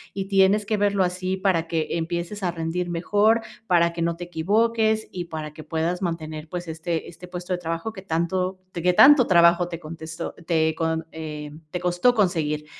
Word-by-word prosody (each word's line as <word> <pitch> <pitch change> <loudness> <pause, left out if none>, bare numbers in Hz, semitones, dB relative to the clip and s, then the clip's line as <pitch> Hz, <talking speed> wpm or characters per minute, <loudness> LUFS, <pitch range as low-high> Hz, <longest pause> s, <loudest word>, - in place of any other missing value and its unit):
y 195 -1 -2
tienes 195 +1 +4
que 215 +1 0
verlo 200 -1 +2
así 185 +1 -2
para 185 -4 +1
que 165 -1 -1
empieces 170 +4 -3
a 185 - 0
rendir 170 +1 -3
mejor, 205 +6 +2 0.3
para 170 -2 +3
que 170 - -4
no 170 0 0
te 175 - -6
equivoques 220 +6 +1
y 180 -1 -5
para 155 -2 -6
que 155 - -10
puedas 165 +4 -2
mantener, 160 -3 -4
pues, 175 0 -5
este 160 0 -3
este 175 +2 -11
puesto 180 +1 -5
de 180 - -2
trabajo 165 +5 -4
que 190 - -9
tanto 185 +2 -1
te 170 - -5
que 180 +1 +3
tanto 265 +4 +7
trabajo 170 0 +5
te 170 -2 -6
contestó 160 +1 -7
te 160 -2 +2
con 160 0 -1
eh, 150 -2 -6 0.2
te 180 - -4
costó 180 +8 +2
conseguir, 155 -7 0
175 Hz, 190 wpm, -24 LUFS, 160-190 Hz, 0.3 s, tanto